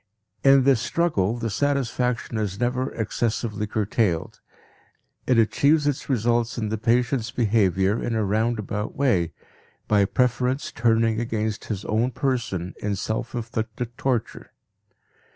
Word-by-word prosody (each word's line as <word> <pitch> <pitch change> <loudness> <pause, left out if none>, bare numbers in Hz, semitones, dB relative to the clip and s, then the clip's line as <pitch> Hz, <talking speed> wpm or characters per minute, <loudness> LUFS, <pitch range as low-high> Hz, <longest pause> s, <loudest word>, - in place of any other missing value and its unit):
In 135 -1 +6
this 130 -4 +4
struggle, 120 - 0
the 115 -2 -3
satisfaction 125 -2 -1
is 100 -2 -3
never 125 +2 0
excessively 110 -1 -2
curtailed; 105 -4 -1 0.9
it 125 - +3
achieves 145 +7 +3
its 145 -1 -1
results 120 -1 +1
in 110 -3 -2
the 110 - -1
patient's 120 +1 +1
behavior 105 -3 +2
in 115 - -2
a 110 - +1
roundabout 105 0 -1
way, 95 - +1 0.6
by 105 -2 +4
preference 125 +4 0
turning 115 -1 +2
against 110 -2 -2
his 105 -3 -4
own 110 +4 +1
person 120 - -2
in 105 -1 -1
self 110 +5 -3
inflicted 115 0 -4
torture. 125 -5 -2
115 Hz, 125 wpm, -24 LUFS, 105-125 Hz, 0.9 s, In